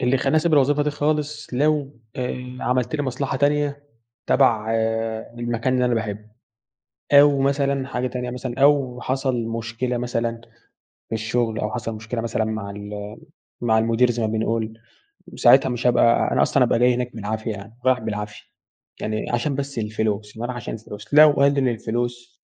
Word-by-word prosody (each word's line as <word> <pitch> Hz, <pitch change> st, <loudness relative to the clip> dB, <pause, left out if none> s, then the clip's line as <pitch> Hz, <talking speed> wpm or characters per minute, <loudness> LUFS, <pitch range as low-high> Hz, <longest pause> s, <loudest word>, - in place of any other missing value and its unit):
اللي 125 Hz, +2 st, +2 dB
خلّاني 135 Hz, +3 st, +1 dB
أسيب 160 Hz, +1 st, +2 dB
الوظيفة 145 Hz, 0 st, +4 dB
دي 150 Hz, -, 0 dB
خالص، 150 Hz, -1 st, -2 dB
لو 145 Hz, -1 st, 0 dB, 0.2 s
آآ، 125 Hz, 0 st, -4 dB
عملت 125 Hz, +2 st, 0 dB
لي 145 Hz, -, -1 dB
مصلحة 135 Hz, 0 st, -2 dB
تانية 145 Hz, 0 st, 0 dB, 0.4 s
تبع 115 Hz, -5 st, +3 dB, 0.7 s
المكان 120 Hz, +2 st, -1 dB
اللي 125 Hz, -1 st, +2 dB
أنا 125 Hz, -, +1 dB
باحبه. 110 Hz, -2 st, -4 dB, 0.8 s
أو 140 Hz, 0 st, +7 dB
مثلًا 140 Hz, -1 st, +1 dB
حاجة 125 Hz, -1 st, -2 dB
تانية 125 Hz, 0 st, -4 dB
مثلًا، 125 Hz, 0 st, -5 dB
أو 135 Hz, -4 st, +3 dB
حصل 130 Hz, -2 st, -1 dB
مشكلة 115 Hz, +2 st, -3 dB
مثلًا 115 Hz, -1 st, -2 dB, 0.7 s
في -, -, -2 dB
الشغل، 110 Hz, 0 st, -1 dB
أو 105 Hz, -, -2 dB
حصل 115 Hz, -2 st, -4 dB
مشكلة 115 Hz, +2 st, -4 dB
مثلًا 115 Hz, -1 st, -1 dB
مع 110 Hz, -2 st, -4 dB
ال 105 Hz, +1 st, -7 dB, 0.4 s
مع 110 Hz, -2 st, +3 dB
المدير 115 Hz, +2 st, +2 dB
زي 120 Hz, -, -3 dB
ما -, -, +1 dB
بنقول، 110 Hz, 0 st, -2 dB, 0.6 s
ساعتها -, -, +5 dB
مش 125 Hz, 0 st, -1 dB
هابقى 120 Hz, -1 st, +3 dB
أنا -, -, +2 dB
أصلًا -, -, +3 dB
هابقى 115 Hz, -, +2 dB
جاي 125 Hz, +1 st, +4 dB
هناك 125 Hz, -1 st, -4 dB
بالعافية 110 Hz, +1 st, -3 dB
يعني، 110 Hz, +3 st, -9 dB
رايح 130 Hz, -1 st, +4 dB
بالعافية، 105 Hz, -1 st, -5 dB, 0.6 s
يعني 110 Hz, 0 st, -3 dB
عشان 120 Hz, +4 st, 0 dB
بس 140 Hz, -1 st, -4 dB
الفلوس 105 Hz, -1 st, -2 dB
بابقي 120 Hz, -, -3 dB
رايح 125 Hz, -, -4 dB
عشان 120 Hz, -, -6 dB
الفلوس 110 Hz, +1 st, -10 dB
لو 150 Hz, +1 st, +8 dB
قَلّل 140 Hz, -2 st, +3 dB
الفلوس 120 Hz, +1 st, -4 dB
120 Hz, 165 wpm, -22 LUFS, 110-135 Hz, 0.8 s, لو